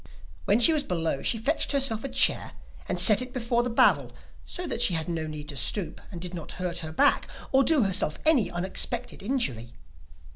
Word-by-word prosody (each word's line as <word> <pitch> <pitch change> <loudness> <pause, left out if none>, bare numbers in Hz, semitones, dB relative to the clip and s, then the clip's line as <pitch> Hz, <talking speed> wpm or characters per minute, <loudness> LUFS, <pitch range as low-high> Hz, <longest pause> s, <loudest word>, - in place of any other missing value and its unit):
When 205 +3 +2
she 320 +7 +7
was 305 - 0
below 165 - -3
she 230 - 0
fetched 285 +7 -1
herself 265 -6 0
a 275 - -4
chair, 260 - +1 0.4
and - - -1
set 215 +1 +7
it 255 0 -6
before 235 -1 0
the 245 - -3
barrel 230 - +2 0.4
so 360 - -6
that - - -3
she 175 - +4
had 160 0 -3
no 165 -2 -4
need 150 -1 -8
to 145 - -6
stoop, 155 - 0
and 175 - -8
did 180 +1 -5
not 165 -4 -7
hurt 180 -1 -4
her 160 -1 -6
back 160 - +2 0.2
or 270 0 +4
do 295 -2 +2
herself 190 -6 0
any 270 - +3
unexpected 190 +7 -3
injury. 165 - -2
200 Hz, 205 wpm, -26 LUFS, 165-255 Hz, 0.4 s, she